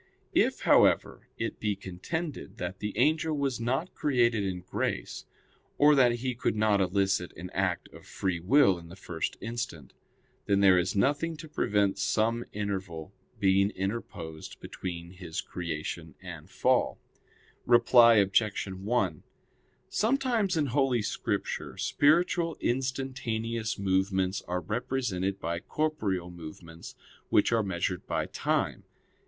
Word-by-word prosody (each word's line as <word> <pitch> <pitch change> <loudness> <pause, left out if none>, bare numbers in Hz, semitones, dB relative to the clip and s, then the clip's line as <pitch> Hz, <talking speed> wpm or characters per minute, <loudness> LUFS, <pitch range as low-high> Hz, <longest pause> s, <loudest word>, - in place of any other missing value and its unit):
If, - - +2
however, - - +3
it - - -3
be 105 -1 0
contended 145 - -5
that 90 +2 -5
the 105 0 -4
angel 155 +4 +2
was 135 -4 -1
not 130 +9 -1
created 120 -7 +2
in 95 -2 -3
grace, 90 - -3 0.5
or 150 +1 +6
that 125 -4 +5
he 125 +2 -2
could 120 -2 -1
not 105 -2 +3
elicit 95 -1 +1
an 90 +1 -7
act 90 -2 -1
of - - -15
free 95 -3 -2
will 95 - +4
in 85 0 -13
the 85 - -10
first 85 -4 -4
instant, 115 - -5 0.5
then 100 -1 +3
there 95 -2 +6
is 90 +2 -1
nothing 150 +9 +1
to 160 - -9
prevent 100 -9 +1
some 115 +2 +1
interval 95 -6 -4 0.3
being 100 0 +4
interposed 95 -6 -5
between 85 -2 -6
his 90 -3 -6
creation 80 -1 -5
and 85 -2 -9
fall. 130 +4 +1 0.7
Reply 120 -1 +7
Obj. 100 +1 +2
1: 95 -3 -1 0.7
Sometimes 230 -6 +1
in 150 - +2
Holy 130 -3 +1
Scripture - - -3
spiritual 165 +2 +2
instantaneous 120 -3 -2
movements 95 -1 +1
are 90 0 -1
represented 100 -2 -2
by 85 0 -2
corporeal 100 - -2
movements 85 0 -10 0.3
which 105 - +4
are 115 -1 +3
measured 90 -2 -2
by - - -1
time. - - -1
100 Hz, 130 wpm, -29 LUFS, 90-125 Hz, 0.7 s, Reply